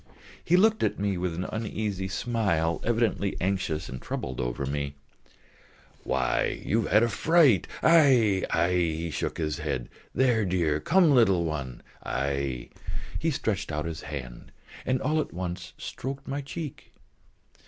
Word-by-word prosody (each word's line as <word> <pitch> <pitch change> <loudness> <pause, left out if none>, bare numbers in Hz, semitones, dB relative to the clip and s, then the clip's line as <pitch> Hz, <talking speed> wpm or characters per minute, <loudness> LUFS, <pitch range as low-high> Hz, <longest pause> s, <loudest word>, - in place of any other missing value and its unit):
He 180 - +4
looked 220 +3 +4
at - - +1
me 100 0 0
with 90 -1 -2
an 90 - -2
uneasy 105 -3 -3
smile, 95 -6 0
evidently 110 -4 0
anxious 90 -4 -1
and 65 0 -7
troubled 65 0 -4
over - - -2
me. 70 0 -3 1.1
"Why, 65 -1 0
you 115 +3 +2
have - - -5
had 105 +2 +6
a - - +4
fright, 135 - +4 0.2
aïe, 130 - +5
aïe!" 85 -1 +1
He 80 +1 -4
shook - - -3
his 75 -2 -2
head. 70 -5 -3 0.3
"There, 125 -4 +3
dear.... 85 -5 +1
Come, 175 - +4
little 95 -10 +4
one, 70 -6 -4 0.2
aïe!" 70 -2 -2 0.5
He 165 - +1
stretched 105 - -1
out 75 0 -2
his 80 -1 -4
hand, 65 -5 -7 0.4
and 130 0 +2
all 155 +3 +2
at - - -7
once 90 0 -5
stroked 135 +1 -6
my 140 +1 -2
cheek. 145 +1 -7
95 Hz, 150 wpm, -27 LUFS, 75-120 Hz, 1.1 s, had